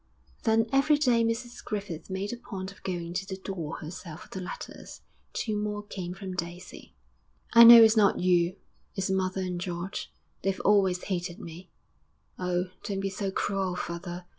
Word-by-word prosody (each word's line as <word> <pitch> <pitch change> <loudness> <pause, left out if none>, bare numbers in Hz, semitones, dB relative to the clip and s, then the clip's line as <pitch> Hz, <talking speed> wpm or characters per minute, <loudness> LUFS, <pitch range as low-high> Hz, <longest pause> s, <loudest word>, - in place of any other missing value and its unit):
Then 225 0 +4
every 290 +2 +4
day 245 -6 +3
Mrs 235 +2 -3
Griffith 200 -7 -5
made 190 +3 -3
a - - -3
point 195 -5 -7
of 200 - -18
going 175 -2 -4
to 190 +2 -2
the 190 -1 -5
door 180 -5 -5
herself 170 0 -8
for - - -17
the 190 - -6
letters. 180 - -8 0.3
Two 215 -2 -2
more 210 0 -2
came 180 -3 -6
from 190 -2 -6
Daisy. 175 0 -7 0.6
_'I 230 0 +11
know 235 -1 +12
it's 220 0 +6
not 205 -3 +4
you; 180 0 +3 0.4
it's 190 0 -1
mother 190 0 0
and 180 -1 -3
George. 180 +1 -4 0.3
They've 195 0 -1
always 190 -3 +3
hated 180 -1 -3
me. 175 -1 -10 0.7
Oh, 180 0 -1
don't 195 -2 -3
be 195 0 -2
so 195 +1 -2
cruel, 190 -1 -1
father! 175 0 -5
190 Hz, 170 wpm, -28 LUFS, 180-210 Hz, 0.7 s, know